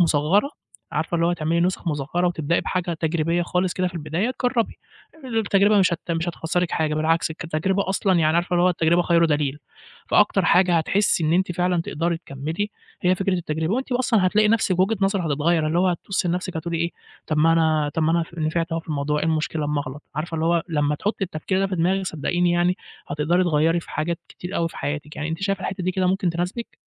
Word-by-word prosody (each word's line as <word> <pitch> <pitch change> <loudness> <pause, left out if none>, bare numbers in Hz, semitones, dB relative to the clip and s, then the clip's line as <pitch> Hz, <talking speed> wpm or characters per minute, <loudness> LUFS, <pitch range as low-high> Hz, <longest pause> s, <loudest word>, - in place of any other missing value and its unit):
مُصغّرة، 170 - +3 0.4
عارفة - - -2
اللي 165 0 +2
هو 175 - +2
تعملي 170 0 0
نُسخ 180 0 0
مصغرة 155 +4 -1
وتبدئي 170 -2 0
بحاجة 180 -2 -2
تجريبية 165 +1 0
خالص 180 +1 0
كده 185 0 0
في 175 - -14
البداية، 170 +9 -2
جرّبي، 245 -2 +1 0.5
التجربة 210 -3 +3
مش 185 -2 +3
هت 170 +1 -4
مش 165 +1 -1
هتخسرِك 175 +1 -1
حاجة، 155 -1 0
بالعكس 160 +1 +1
كتجربة 170 +5 -1
أصلًا 190 0 +1
يعني 155 0 +3
عارفة 175 +1 0
اللي 175 - +3
هو 180 - +5
التجربة 170 0 +2
خير 170 -1 +3
دليل، 145 -2 0 0.5
فأكتر - - +3
حاجة 180 -1 +4
هتحسّي 180 0 +1
إن 155 - +2
أنتِ 180 +1 +1
فعلًا 180 0 +1
تقدري 170 +1 -1
تكمّلي 160 +7 -4 0.3
هي 180 +1 +4
فكرة 195 +1 -1
التجربة، 160 +1 -1
وأنتِ 265 +1 -3
أصلًا 235 -6 +2
هتلاقي 210 +3 +3
نفْسِك 205 -5 +2
وجهة 195 +5 +2
نظرِك 195 -1 +1
هتتغيّر، 155 +2 +1
اللي 160 +3 +1
هو 185 +1 +3
هتبُصّي 180 +1 -1
لنفسِك 180 0 -2
هتقولي 165 +1 -3
إيه، 170 +1 0 0.4
"طَب 155 - -1
ما 165 +2 +5
أنا 155 -2 +2
طَب 160 - 0
ما 155 - +2
أنا 170 - +2
ف 170 +1 -10
نفعت 165 +2 -1
أهو 165 - -1
في - - -24
الموضوع، 150 0 -1
إيه - - 0
المشكلة 155 -1 -1
أمّا 145 0 0
أغلط" 140 +1 -7
عارفة 160 +3 -4
اللي 160 0 -1
هو 170 0 +2
لمّا 150 -2 +1
تحطّي 200 +5 -2
التفكير 180 +2 -2
ده 195 - +2
في 190 -1 -3
دماغِك 185 +3 +1
صدّقيني 175 +2 0
يعني، 175 +1 +2 0.3
هتقدري 155 +5 +1
تغيّري 165 0 +2
في - - -14
حاجات 165 +2 -2
كتير 180 +2 -7
أوي 165 0 +1
في - - -13
حياتِك، 150 +1 -4
يعني 155 +1 -3
أنتِ 165 +3 -4
شايفة 195 0 0
الحتّة 190 -1 -4
دي 185 - +1
كده 185 0 0
ممكن 185 -1 +1
تناسبِك؟ 180 +7 -4
170 Hz, 215 wpm, -23 LUFS, 160-185 Hz, 0.5 s, هو